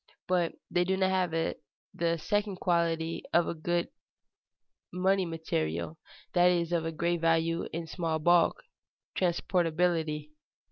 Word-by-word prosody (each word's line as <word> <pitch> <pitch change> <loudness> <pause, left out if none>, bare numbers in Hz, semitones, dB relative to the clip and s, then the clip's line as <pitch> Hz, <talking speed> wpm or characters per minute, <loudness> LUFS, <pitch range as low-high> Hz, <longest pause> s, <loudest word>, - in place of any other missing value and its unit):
But 180 -2 +1 0.2
they 175 - +3
do 190 +1 0
not 190 0 +2
have 185 -1 +1
the 165 +1 -3
second 205 +4 -1
quality 165 -2 0
of 170 0 +4
a - - -1
good 170 +1 -1 1.0
money 185 +1 +1
material, 155 - -3 0.3
that 175 -1 +5 0.3
of 165 -2 -1
great 170 0 0
value 165 0 +1
in 165 +1 -4
small 165 -1 -2
bulk, 170 +2 +3 0.5
transportability. 165 -3 0
170 Hz, 120 wpm, -30 LUFS, 165-180 Hz, 1.0 s, that